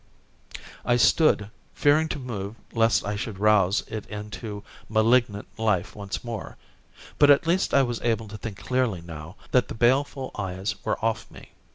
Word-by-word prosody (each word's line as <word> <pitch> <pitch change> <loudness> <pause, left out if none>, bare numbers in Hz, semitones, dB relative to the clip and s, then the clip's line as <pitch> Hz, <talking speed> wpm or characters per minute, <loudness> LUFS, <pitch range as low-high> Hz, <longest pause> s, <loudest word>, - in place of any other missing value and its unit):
I 120 - +2
stood, 115 -5 +3 0.2
fearing 155 +2 +3
to - - -3
move 110 -6 -5 0.2
lest 115 -1 +3
I 105 +1 -2
should 105 -1 -5
rouse 100 -1 +3
it 110 -2 -6
into 105 0 -7 0.3
malignant 110 -1 +2
life 105 -6 0
once 100 -1 -5
more. 115 -4 -6 0.6
But 145 - +7
at 145 +3 +6
least 175 +3 +1
I 140 - +5
was 120 -2 -3
able 115 -2 0
to 110 - -7
think 105 -3 -6
clearly 125 -8 -1
now 85 +1 -9 0.2
that 125 -4 +3
the - - -7
baleful 130 +3 +1
eyes 95 0 -3
were 110 - 0
off 115 -2 -1
me. - - -14
110 Hz, 165 wpm, -25 LUFS, 100-125 Hz, 0.6 s, But